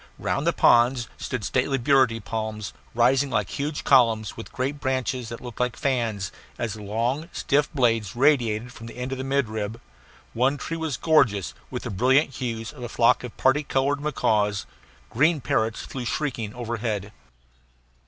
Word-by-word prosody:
Round - - -1
the - - +5
ponds 120 0 +4
stood 125 -5 -4
stately 130 +4 +1
burity 130 -2 +3
palms, 110 -1 -4 0.2
rising 130 +4 +3
like 105 -6 -1
huge 145 +1 -3
columns, 115 -5 +4
with 115 - -9
great 135 +3 -2
branches 130 -3 -1
that 115 - -7
looked 120 -2 -9
like 125 -1 0
fans, 115 -8 -1 0.3
as 115 -4 -2
the 110 - -9
long, 120 - -1
stiff 145 +1 +1
blades 115 -7 +1
radiated 125 -4 +2
from 115 - -10
the - - -10
end 125 +1 -4
of 135 - -3
the - - -2
midrib. 115 -5 -1 0.5
One 130 +5 +2
tree 165 - -4
was 160 -6 -2
gorgeous 120 - +3 0.2
with - - -5
the - - -4
brilliant 130 +8 +3
hues 120 0 -4
of 140 - -12
a 120 - -5
flock 115 +1 +3
of 125 - -8
party 130 +3 +3
colored 140 0 0
macaws. 105 -8 +1 0.5
Green 155 +6 +3
parrots 110 -2 0
flew 125 -2 -6
shrieking 120 -6 -2
overhead. 110 -4 -3
120 Hz, 165 wpm, -25 LUFS, 110-135 Hz, 0.5 s, the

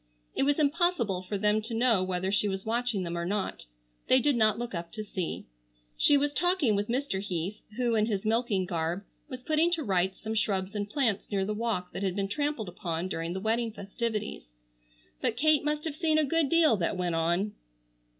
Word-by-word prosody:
It - - -1
was 285 +1 +3
impossible 290 - +1
for 195 +2 -3
them 210 +2 +2
to 225 +2 -4
know 225 -5 +3
whether 185 +1 -1
she 205 +1 +2
was 190 -1 -3
watching 230 -3 0
them 170 -1 -3
or 170 - -2
not. 195 +3 -2 0.4
They 255 - +6
did 285 +1 +3
not 215 -2 +3
look 240 -1 -4
up 170 -1 -5
to 215 - -4
see. 185 -4 -4 0.5
She 290 - +5
was 290 +1 0
talking 350 - +2
with 205 +1 -1
Mr. 250 -4 -1
Heath 190 0 -3 0.2
who, 245 -2 +1
in 215 -1 +2
his 205 -2 -2
milking 220 -4 +1
garb, 170 +1 -2 0.3
was 255 -2 -7
putting 315 +3 +3
to 325 -3 0
rights 190 -3 0
some 220 0 -4
shrubs 200 -3 0
and 205 -1 -3
plants 225 -5 0
near 195 -2 0
the 210 - -1
walk 210 -5 -2
that - - -4
had 190 -2 -1
been 200 -1 -1
trampled 290 -5 -1
upon 175 0 -3
during 165 -1 -3
the 190 - -3
wedding 225 +3 0
festivities. 215 - -4 0.7
But 225 - 0
Kate 310 +2 +4
must 300 0 -1
have 310 -3 -3
seen 315 -1 +2
a 310 - +4
good 315 0 +2
deal 325 -9 +5
that 180 +1 -1
went 180 -2 -1
on. 175 +5 +1
215 Hz, 210 wpm, -29 LUFS, 190-255 Hz, 0.7 s, They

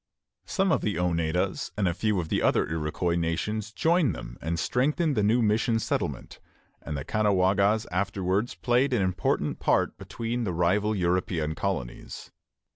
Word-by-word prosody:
Some 195 -2 +1
of - - +2
the 105 - -1
Oneidas 85 -1 0
and 100 -3 +1
a 85 - +1
few 105 +1 0
of 80 -2 -4
the - - +1
other - - +2
Iroquois 80 +2 -1
nations 100 +6 -2
joined 160 - +2
them - - -8
and 85 +2 -2
strengthened 150 - +1
the 105 - +2
new 115 +4 +3
mission 110 +2 +2
settlement; 110 - -3 0.4
and 75 - -5
the 65 - -5
Caughnawagas 100 0 +2
afterwards 95 +3 -1
played 125 +2 +1
an 110 -6 +2
important 95 -2 -1
part - - +1
between 120 +1 -3
the 95 -5 -2
rival 100 +6 +1
European 90 -3 0
colonies. 80 -10 -4
100 Hz, 155 wpm, -27 LUFS, 85-110 Hz, 0.4 s, new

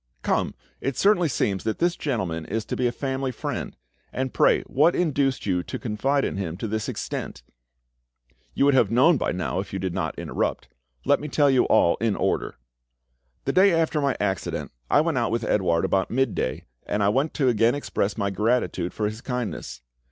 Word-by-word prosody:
Come, - - 0 0.2
it 135 0 -3
certainly 195 -4 +4
seems 100 -7 -1
that 110 - -1
this 175 +1 +1
gentleman 95 - -2
is 110 +5 -3
to - - -3
be 125 - +1
a - - 0
family 135 0 -2
friend. 115 - -5 0.3
And 130 0 -3
pray - - +3
what 155 +6 +2
induced 140 -6 0
you 90 -3 +1
to - - -6
confide 135 +6 0
in - - -3
him 85 -4 -3
to 110 - -4
this 110 0 -2
extent?" - - -5 1.1
"You - - +3
would 140 - +5
have 120 -6 +4
known 135 +8 +5
by - - -1
now, 90 +1 -2
if 100 - -6
you - - -1
did 95 -2 -3
not - - -3
interrupt. - - -2 0.4
Let - - +4
me 150 - -5
tell 145 -1 +3
you 130 - +4
all 85 -6 +4
in 110 -3 0
order. - - -1 0.9
The - - 0
day 185 -2 +5
after 160 -2 +1
my 140 -2 0
accident 95 -4 -2 0.2
I - - +5
went 160 -5 0
out 115 - 0
with 115 0 -1
Edouard 90 -6 +1
about 95 -1 +1
midday, 120 - -1 0.2
and 105 0 0
I 100 - +4
went 135 +8 0
to 135 -4 +2
again 115 +1 +3
express 105 -7 -2
my 100 -2 0
gratitude 105 -4 0
for 105 - -1
his 110 +2 -4
kindness. 120 - -4
120 Hz, 195 wpm, -25 LUFS, 100-140 Hz, 1.1 s, would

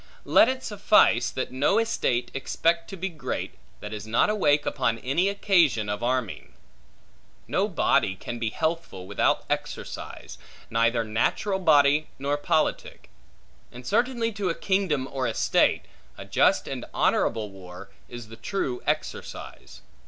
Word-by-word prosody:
Let 225 - +5
it 260 0 -3
suffice, 200 - +3
that 130 - -4
no 140 +10 +2
estate 130 - 0
expect 165 +5 0
to 195 - -7
be 190 +2 -2
great, 165 -5 -5 0.3
that 105 +1 -7
is 105 0 -7
not 115 - +2
awake 145 -8 +2
upon 115 -4 0
any 135 +10 0
just 200 0 -2
occasion 160 - +3
of 105 +1 -3
arming. 120 - -2 0.9
No - - +1
body 95 - +1
can 120 +5 -7
be 115 -1 -1
healthful 160 - -3
without - - 0
exercise, - - -5 0.3
neither 115 +1 +2
natural 120 - 0
body 150 -3 +4
nor 140 +2 -1
politic; 145 +1 -1 0.6
and 125 +1 -11
certainly 235 - +1
to 200 -3 -2
a 165 - -1
kingdom 185 -9 0
or 130 -2 -1
estate, - - +2 0.3
a - - -8
just - - +2
and - - -5
honorable 110 -3 +1
war, 95 0 -12 0.2
is 120 -2 -9
the 115 - -11
true 130 - -3
exercise. - - -5
140 Hz, 145 wpm, -26 LUFS, 115-190 Hz, 0.9 s, Let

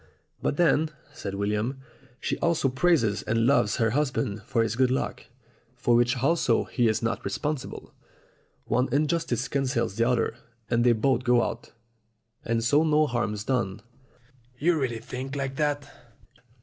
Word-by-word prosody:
"But - - -1
then," 160 -2 +3 0.2
said 100 -1 -5
William, 105 +6 -1 0.4
"she - - -1
also 170 -5 +2
praises 130 - +2
and 115 +1 0
loves 140 +3 +3
her 115 -2 +1
husband 130 -6 -1
for 115 -2 +2
his 115 0 -2
good 130 +1 +3
luck, 130 - -2 0.5
for 125 -1 +1
which 120 +1 +3
also 135 -3 +2
he 120 -3 0
is 110 +1 0
not 115 -2 -1
responsible. 135 +8 -4 0.7
One 125 +3 +1
injustice 145 -3 0
cancels 125 -6 -1
the 115 0 +3
other, 125 -2 +1 0.4
and 120 0 +3
they 120 -1 +5
both 125 +2 +1
go 120 -2 +4
out, - - -5 0.7
and 115 0 0
so 145 +6 +4
no 155 -1 +3
harm's 115 -6 -2
done." 115 -7 -1 0.7
"You 170 +5 +2
really 120 -3 -1
think 130 +4 -6
like 135 -1 -3
that?" 145 -1 0
125 Hz, 150 wpm, -26 LUFS, 115-140 Hz, 0.7 s, they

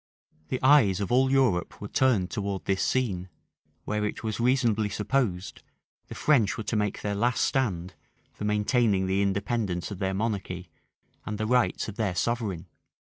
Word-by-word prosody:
The 130 - -2
eyes 130 -9 +5
of 100 +1 -3
all 130 +2 +4
Europe 130 -10 +1
were 105 - -6
turned 110 -7 +2
towards 100 -5 -3
this 95 -1 0
scene; 95 -8 0 0.6
where, 105 0 -1
it 105 - -3
was 110 -1 -3
reasonably 115 -4 +2
supposed, 105 -2 -1 0.5
the - - -8
French 125 -10 +2
were 110 - -4
to 110 - -2
make 105 -1 -1
their 105 - -2
last 120 +4 +1
stand 95 -9 -1 0.4
for - - -8
maintaining 105 -1 +2
the 95 +1 +1
independence 100 -2 -1
of 100 - -6
their 95 -1 -1
monarchy, 95 -5 -3 0.5
and 105 - -4
the 110 - -2
rights 125 +1 +1
of 110 - -7
their 105 -6 -1
sovereign. 105 -3 -1
105 Hz, 165 wpm, -27 LUFS, 95-120 Hz, 0.6 s, eyes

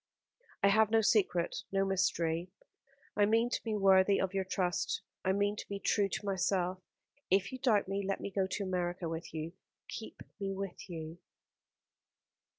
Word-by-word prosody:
"I 200 - +7
have 215 +1 +5
no 225 0 +4
secret, 195 -5 +2
no 195 0 +2
mystery; 175 -3 0 0.7
I 205 - +4
mean 230 +3 +3
to - - -2
be 220 -2 -1
worthy 195 0 +5
of 190 0 -1
your 195 -1 +1
trust. 185 -1 -1 0.2
I 190 - +2
mean 205 +1 +1
to - - -8
be 200 - -3
true 200 0 +2
to 205 - -4
myself. 185 -1 0 0.5
If 195 +1 +2
you 260 - -6
doubt 220 -7 +3
me 195 +1 -1
let 195 0 -1
me - - -5
go 190 0 +1
to 200 +2 -3
America 180 -2 -2
with 165 +1 -5
you. 160 +1 -5 0.4
Keep 220 - -7 0.2
me 195 -1 -2
with 195 -1 -6
you." 165 0 -6
195 Hz, 170 wpm, -33 LUFS, 180-205 Hz, 0.7 s, I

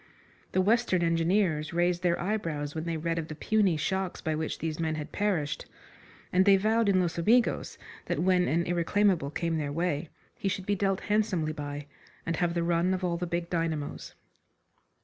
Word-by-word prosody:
The 185 - +3
Western 205 -3 +2
Engineers 165 -1 +1
raised 175 +1 +1
their 175 -1 +1
eyebrows 165 -7 -2
when 160 0 -4
they 165 -1 -2
read 165 +1 -1
of 160 - -4
the 155 - -7
puny 200 -1 +2
shocks 190 +3 -2
by 160 - -2
which 155 0 -2
these 160 -1 -3
men 160 -1 0
had 150 -1 -6
perished, 185 -9 -1 0.7
and 185 +1 +5
they 195 0 +6
vowed 220 +2 +2
in 190 -2 +4
Los 170 -2 -1
Amigos 230 +8 +2 0.3
that - - -1
when 180 0 +3
an 170 +2 +2
irreclaimable 175 -2 +1
came 165 +1 -1
their 145 -2 -2
way 160 -1 -1 0.2
he 195 - -2
should 185 0 -3
be 205 - +1
dealt 195 -1 0
handsomely 205 -7 0
by, 145 -1 -5 0.4
and 165 -1 -1
have 175 -1 0
the 170 - +1
run 170 +2 +2
of 185 - -5
all 175 -1 0
the 175 +1 -3
big 170 0 -2
dynamos. 165 -4 -3
170 Hz, 190 wpm, -29 LUFS, 160-190 Hz, 0.7 s, they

